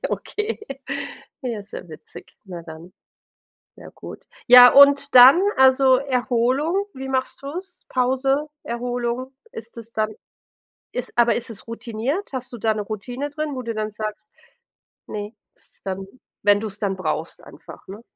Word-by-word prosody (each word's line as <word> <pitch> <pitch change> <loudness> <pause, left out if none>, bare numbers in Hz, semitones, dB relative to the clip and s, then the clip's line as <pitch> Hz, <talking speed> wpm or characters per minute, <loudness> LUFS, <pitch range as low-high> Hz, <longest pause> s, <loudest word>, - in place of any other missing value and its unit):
Okay. 425 +1 -3 0.8
Ja, 235 -5 -3
ist 200 - -16
ja - - -8
witzig. 155 - -13
Na 175 -3 -8
dann. 165 +2 -12 0.8
Sehr - - -13
gut. - - -11 0.2
Ja, 250 0 +10
und 280 0 +6
dann, 260 +8 +9 0.2
also 265 0 +6
Erholung, 265 +7 0
wie 265 0 -7
machst 260 -1 -2
du's? 345 +8 -8
Pause, 270 +3 0
Erholung, 245 +2 -3 0.2
ist 230 +1 -9
es 230 0 -9
dann 215 0 -1 0.8
ist 250 - -5
aber 240 0 +4
ist 235 0 -6
es 225 - -10
routiniert? 235 - -4
Hast 255 0 -5
du 240 - -7
da 220 0 +1
'ne 215 - -3
Routine 245 +7 -5
drin, 300 -1 -4
wo 255 - -4
du 230 -1 -4
dann 215 0 -3
sagst 215 0 -6 0.8
ne. 210 +1 -6 0.2
Ist - - -19
es - - -16
dann 190 0 -5 0.4
wenn 205 0 +4
du's 215 -2 -6
dann 195 -2 -2
brauchst 160 -2 -4
einfach, 150 - -14
ne? 200 +4 -9
240 Hz, 155 wpm, -22 LUFS, 215-265 Hz, 0.8 s, Ja